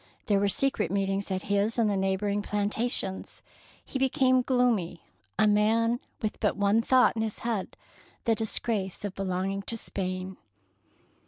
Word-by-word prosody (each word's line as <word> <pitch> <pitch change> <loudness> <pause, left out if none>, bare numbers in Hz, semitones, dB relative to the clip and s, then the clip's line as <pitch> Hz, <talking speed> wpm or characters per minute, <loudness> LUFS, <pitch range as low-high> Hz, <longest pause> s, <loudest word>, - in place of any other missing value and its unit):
There 205 -2 +2
were 200 0 +2
secret 270 -5 +1
meetings 195 +1 -1
at 190 0 -2
his 205 +3 0
and 230 -2 +3
the 205 - +1
neighbouring 195 +2 0
plantations. 205 -1 -2 0.4
He 265 - -4
be 265 0 +3
came 255 0 +3
gloomy, 240 -10 +1 0.3
a 215 - +4
man 225 +3 +3 0.2
with 215 - -2
but - - 0
one 205 +2 +3
thought 255 0 +4
in 220 - -1
his 220 -1 -3
head, 225 -5 -2 0.2
— - - -29
the 230 - +3
disgrace 215 -3 -1
of 200 - -4
belonging 195 +1 -2
to 230 +3 -3
Spain. 185 -2 -4
205 Hz, 160 wpm, -28 LUFS, 195-230 Hz, 0.4 s, a